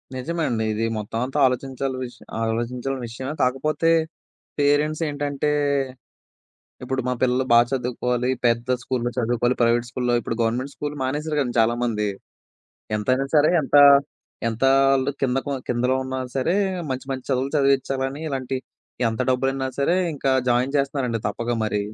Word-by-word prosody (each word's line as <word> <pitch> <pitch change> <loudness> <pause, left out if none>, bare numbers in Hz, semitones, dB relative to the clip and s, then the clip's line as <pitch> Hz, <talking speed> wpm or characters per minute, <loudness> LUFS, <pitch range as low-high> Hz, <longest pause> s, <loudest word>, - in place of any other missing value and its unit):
నిజమే 165 +6 -2
అండి. 110 -2 -1
ఇది 110 - -2
మొత్తమంతా 115 +6 -3
ఆలోచించాల్సిన 130 +1 -2
విష 125 -1 -8 0.2
ఆలోచించాల్సిన 125 +4 -2
విషయమే. 130 +5 -5
కాకపోతే 150 +5 +1 0.7
పేరెంట్స్ 150 +2 +2
ఏంటంటే, 145 0 -1 1.3
ఇప్పుడు 130 +1 -2
మా 125 - +1
పిల్లలు 130 +1 +2
బాగా 120 0 +7
చదువుకోవాలి, 125 0 -1 0.2
పెద్ద 120 +2 +1
స్కూలులో 120 -2 -2
చదువుకోవాలి, 120 +1 +1
ప్రైవేట్ 120 +1 +2
స్కూల్‌లో 125 -1 0
ఇప్పుడు 115 - -4
గవర్నమెంట్ 125 +5 -1
స్కూలు 145 0 -5
మానేశారు 150 +3 -2
గదండీ 120 -3 -2
చాలామంది. 115 -2 +1 0.9
ఎంతైనా 130 +5 +1
సరే, 150 +1 +5
ఎంత 135 - +1 0.7
ఎంత 115 +3 -2 0.3
ఆళ్లు 135 +1 +2
కిందకున 135 +2 0
కిందలో 125 +2 +1
ఉన్నా 130 0 -4 0.2
సరే 135 +7 +1 0.3
మంచి 130 0 -4
మంచి 130 -1 -4
చదువులు 135 0 0
చదివించాలని 135 0 +1
ఇలాంటి 135 -2 -3 0.5
ఎంత 110 +2 -4
డబ్బులైనా 135 +1 0
సరే 140 +5 +2 0.2
ఇంకా 135 -1 0 0.2
జాయిన్ 125 +4 +1
చేస్తున్నారండి. 135 -4 0
తప్పక 115 +3 -2
మరి. 105 -1 0
130 Hz, 135 wpm, -23 LUFS, 120-135 Hz, 1.3 s, బాగా